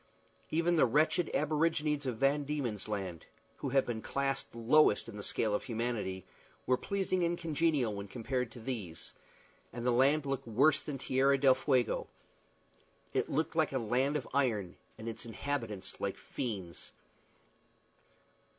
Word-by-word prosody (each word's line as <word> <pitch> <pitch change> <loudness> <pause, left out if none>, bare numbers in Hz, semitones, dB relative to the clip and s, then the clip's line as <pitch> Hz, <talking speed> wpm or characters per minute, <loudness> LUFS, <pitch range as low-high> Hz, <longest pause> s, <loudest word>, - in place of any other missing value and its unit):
Even 170 +2 +2
the 140 - +5
wretched 155 +6 +2
aborigines 150 -1 +1
of 120 -3 -2
Van 140 +3 +2
Dieman's 135 -9 -3
Land, 95 -5 -4 0.3
who 135 - -3
have 135 +1 +3
been 115 -2 -3
classed 135 -1 -2
lowest 115 0 +4
in 115 - -8
the 105 - -6
scale 105 +1 0
of 105 - -1
humanity, 115 -6 -2 0.4
were 130 - +4
pleasing 185 +3 -1
and 170 0 +1
congenial 155 -8 +1
when 100 0 -5
compared 125 +2 -2
with 115 -2 -10
these, 105 -11 -5 0.6
and 120 0 -6
the 125 - +4
land 140 +5 +4
looked 135 -3 -3
worse 135 +8 +4
than 145 -2 -5
Tierra 135 +1 +3
del 135 -1 +6
Fuego. 130 -1 +1 1.1
It - - 0
looked 160 +3 -1
like 160 -3 +2
a - - +1
land 130 +5 +1
of 130 - -6
iron, 110 -10 +1 0.2
and 110 +1 -8
its 115 - -5
inhabitants 115 -3 -4
like - - -2
fiends. 95 -9 -5
130 Hz, 150 wpm, -33 LUFS, 115-150 Hz, 1.1 s, del